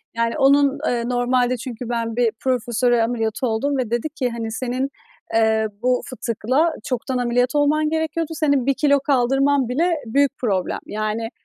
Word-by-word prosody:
Yani 230 0 0
onun, 280 +1 +4
eee, 240 -1 0
normalde 245 0 +1
çünkü 240 0 -7
ben 230 -1 -2
bir 235 -2 +2
profesöre 240 -1 +1
ameliyatı 225 +1 -1
oldum 275 +6 0
ve 245 -4 -2
dedi 240 +6 -1
ki, 265 -5 -2
hani, 230 -1 -5
"Senin, 255 +3 -2 0.4
eee, 220 -1 +3 0.2
bu 250 0 +2
fıtıkla 255 +6 0
çoktan 255 +1 -2
ameliyat 245 +2 +1
olman 300 +1 +2
gerekiyordu, 320 0 -2
senin 285 -5 +2
1 275 - +3
kilo 280 +1 +3
kaldırman 270 -1 +2
bile 335 +6 +1
büyük 280 +4 +2
problem. 195 -7 -1
Yani, 215 +1 -3
250 Hz, 155 wpm, -21 LUFS, 230-280 Hz, 0.4 s, onun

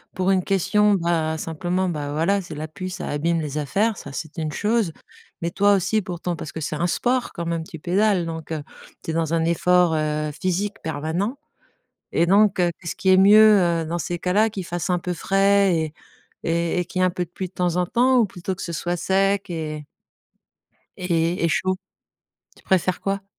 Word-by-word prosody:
Pour 185 +1 +1
une 185 -1 +3
question, 210 +2 +3
bah, 165 -3 0
simplement, 175 +4 -2
bah, 145 -3 -4
voilà 195 +6 +1
c'est 165 -4 -9
la 155 +1 -5
pluie, 185 +5 -6
ça 180 - -5
abîme 165 +3 0
les 150 -1 -4
affaires, 200 +9 0
ça 140 - -9
c'est 160 +4 -7
une 155 -2 -3
chose, 210 -5 0 0.5
mais 170 0 -2
toi 205 +2 +4
aussi, 200 +3 +1
pourtant, 175 -2 -4
parce 155 - -7
que 160 - -5
c'est 150 0 -3
un 175 +3 0
sport 250 +7 0
quand 170 -2 -5
même, 165 -1 -2
tu 165 -3 -9
pédales, 185 +2 +1
donc 160 -1 -5
heu, 150 -2 -4 0.4
tu - - -3
es - - -4
dans 165 -1 -1
un 165 -1 +2
effort, 175 0 +3
heu, 150 0 -1
physique 195 +3 -1
permanent, 160 - -2 0.7
et 170 - +2
donc 200 +1 +4
heu, 175 -1 +3
qu'est-ce 170 - -5
qui 190 - 0
est 185 - +7
mieux, 210 +1 +7 0.2
heu, - - -6
dans 170 +2 -3
ces 175 +2 -3
cas-là? 205 +6 +2
Qu'il 195 -4 -6
fasse 175 +2 -4
un 180 - +2
peu 180 +1 -3
frais 195 +1 +3
et 160 -2 -2 0.5
et 170 +1 0
et 175 - -1
qu'il 185 +1 -3
y - - +4
ait - - +5
un - - +3
peu 180 0 -2
de 170 - -29
pluie 185 0 -5
de - - -38
temps 180 -2 0
en 180 0 +1
temps? 255 +6 +3
Ou 235 - +5
plutôt 185 -1 -5
que - - -7
ce 170 - -4
soit 175 +3 -2
sec 195 +1 +1
et 155 -2 -4 1.1
et 170 -1 0
et - - +4
chaud? 185 +3 +1 0.8
Tu - - -21
préfères 185 -1 +1
quoi? 195 0 -2
175 Hz, 215 wpm, -23 LUFS, 160-195 Hz, 1.1 s, est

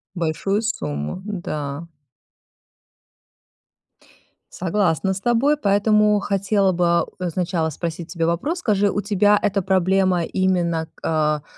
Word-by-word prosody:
Большую 175 +5 -1
сумму. 75 - -3
Да. 160 -6 -5 2.7
Согласна 185 0 0
с 190 - -6
тобой, 240 +7 +2
поэтому 210 -2 +3
хотела 195 0 +1
бы, 180 0 0
а, 170 0 +3
у, 180 -1 -5
сначала 170 -1 -1
спросить 165 +2 -5
у - - -13
тебя 165 -2 0
вопрос. 250 - -1
Скажи, 205 - +1
у 205 - -1
тебя 205 +1 +3
эта 200 -1 +1
проблема 185 -1 +2
именно 170 -3 0
к - - -23
а, 150 -2 +1
185 Hz, 125 wpm, -21 LUFS, 165-205 Hz, 2.7 s, поэтому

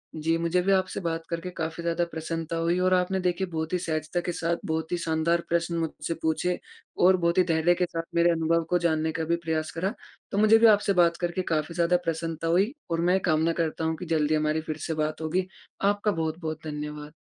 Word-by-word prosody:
जी, 160 +1 0
मुझे 170 +2 +1
भी 195 +2 +1
आपसे 185 -1 +1
बात 165 -1 -3
करके 170 +2 -3
काफ़ी 165 -1 -4
ज़्यादा 170 0 +1
प्रसन्नता 165 +1 -4
हुई 170 +2 +1
और 185 0 +3
आपने 185 +1 +1
देखिए 180 +1 0
बहुत 160 0 -4
ही - - +3
सहजता 155 0 -2
के 175 - 0
साथ 170 0 -1
बहुत 160 0 -2
ही 175 - +1
शानदार 170 +1 +1
प्रश्न 170 0 0
मुझसे 160 -1 -3
पूछे 170 +3 0 0.5
और 185 0 +6
बहुत 170 +1 +1
ही 185 - +6
धैर्य 165 0 +3
के 180 0 +1
साथ 165 -1 -4
मेरे 170 0 +4
अनुभव 165 0 +1
को 180 - +3
जानने 160 -1 +1
का 160 +1 -3
भी 170 +1 +1
प्रयास 155 -1 -1
करा। 190 +6 -2 0.4
तो 200 - -2
मुझे 215 +1 +6
भी 230 - +5
आपसे 205 -2 +4
बात 170 0 +3
करके 175 +1 -1
काफ़ी 155 +1 -1
ज़्यादा 175 +1 +3
प्रसन्नता 165 0 -2
हुई, 195 - +2 0.2
और 165 0 0
मैं 180 +2 +3
कामना 160 0 +2
करता 165 -1 -2
हूँ 160 0 0
कि 180 - -6
जल्दी 155 -2 +1
हमारी 155 +1 +1
फ़िर 155 -1 -5
से 160 - -1
बात 155 +1 -3
होगी 180 +4 -1 0.3
आपका 205 +1 +2
बहुत-बहुत 160 -1 -3
धन्यवाद। 150 -1 -6
165 Hz, 220 wpm, -27 LUFS, 160-180 Hz, 0.5 s, और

